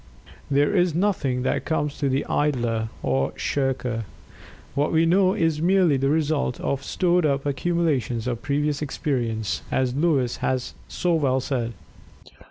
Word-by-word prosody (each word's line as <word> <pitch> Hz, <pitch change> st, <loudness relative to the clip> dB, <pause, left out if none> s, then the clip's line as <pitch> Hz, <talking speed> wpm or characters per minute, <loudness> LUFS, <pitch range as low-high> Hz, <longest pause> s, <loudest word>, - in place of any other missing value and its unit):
There 145 Hz, +7 st, +2 dB
is 175 Hz, -3 st, +2 dB
nothing 150 Hz, -10 st, 0 dB
that -, -, 0 dB
comes 150 Hz, -3 st, -2 dB
to 140 Hz, -, +1 dB
the 135 Hz, +2 st, 0 dB
idler, 120 Hz, -6 st, 0 dB
or 65 Hz, 0 st, 0 dB
shirker. 125 Hz, -5 st, -1 dB, 0.7 s
What 145 Hz, +2 st, 0 dB
we 165 Hz, 0 st, +3 dB
know 185 Hz, +2 st, +3 dB
is 165 Hz, -3 st, +1 dB
merely 180 Hz, -3 st, +4 dB
the 135 Hz, +1 st, +1 dB
result 150 Hz, -4 st, 0 dB
of 140 Hz, 0 st, -2 dB
"stored 180 Hz, +2 st, +1 dB
up 140 Hz, -2 st, +1 dB
accumulations 145 Hz, -5 st, 0 dB
of 120 Hz, -2 st, -2 dB
previous 145 Hz, +1 st, -1 dB
experience," 120 Hz, -7 st, -2 dB
as 130 Hz, -2 st, 0 dB
Lewes 140 Hz, -5 st, +1 dB
has 130 Hz, -1 st, -2 dB
so 175 Hz, -1 st, 0 dB
well 135 Hz, -5 st, +2 dB
said. 120 Hz, -3 st, -2 dB
140 Hz, 145 wpm, -24 LUFS, 125-160 Hz, 0.7 s, merely